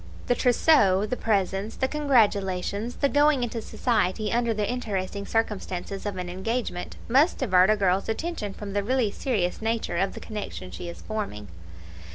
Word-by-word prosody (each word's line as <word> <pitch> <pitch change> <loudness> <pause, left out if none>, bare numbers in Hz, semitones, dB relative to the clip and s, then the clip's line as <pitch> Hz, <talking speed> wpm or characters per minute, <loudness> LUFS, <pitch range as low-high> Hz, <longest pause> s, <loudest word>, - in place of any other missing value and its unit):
The - - +3
TROUSSEAU, 230 -6 +4
the - - +2
presents, 200 -1 0
the 265 - 0
congratulations, 215 -6 +1
the 280 - +2
going 290 -2 +3
into 230 -1 -3
society 215 -3 0
under 235 0 +2
the 210 -2 -1
interesting 200 -5 -3
circumstances 200 -3 -2
of 200 -2 -4
an 180 -1 -4
engagement, 190 +1 -3
must 275 +8 +4
divert 185 -6 +4
a 215 - +5
girl's 195 0 +1
attention 225 - -3
from 200 -2 -7
the 205 - +1
really 245 -1 +1
serious 205 -7 -1
nature 225 -5 -1
of 190 +2 0
the - - -6
connection 205 -4 -6
she 175 - -6
is 170 - -10
forming. 200 - -5
210 Hz, 165 wpm, -26 LUFS, 190-245 Hz, -, a